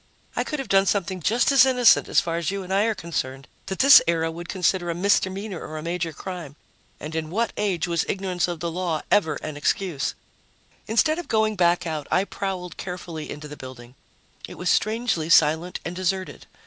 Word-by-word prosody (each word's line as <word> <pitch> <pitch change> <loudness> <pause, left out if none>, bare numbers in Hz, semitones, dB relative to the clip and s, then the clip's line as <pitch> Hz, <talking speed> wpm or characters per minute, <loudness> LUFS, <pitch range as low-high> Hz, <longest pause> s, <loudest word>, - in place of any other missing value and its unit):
I - - 0
could 300 - -4
have 270 - -5
done 195 0 +3
something 190 -2 0
just 235 - +2
as 270 -3 +7
innocent, 250 -2 +5
as - - +4
far 165 -1 -2
as 170 - -1
you 195 0 -3
and 185 +1 -5
I 200 +2 +3
are 225 -1 0
concerned, 135 -7 -4 0.2
that 190 0 -4
this 275 0 +9
era 165 -1 +1
would 170 +1 -9
consider 185 -1 0
a 170 - -1
misdemeanor 195 0 0
or 155 0 -7
a 155 - -6
major 170 0 -2
crime. 170 -4 -8 0.4
And 155 +2 -7
in 160 -1 -3
what 225 +6 -1
age 185 -5 -1
was 170 -2 0
ignorance 185 -2 -1
of 175 -2 -5
the 170 -1 -2
law 170 -2 -2
ever 175 -6 +3
an 155 -1 -5
excuse? 155 0 -1 0.7
Instead 310 +9 +2
of 350 - -7
going 220 -1 +1
back 175 -1 +2
out, 155 -3 -4
I 185 - +2
prowled 190 -3 -5
carefully 170 -4 -6
into 150 +1 -7
the 150 - -9
building. 125 -2 -11 0.5
It - - -11
was 180 - 0
strangely 215 -7 0
silent 160 +2 +3
and 175 - -4
deserted. 185 -5 -3
180 Hz, 200 wpm, -24 LUFS, 160-195 Hz, 0.7 s, this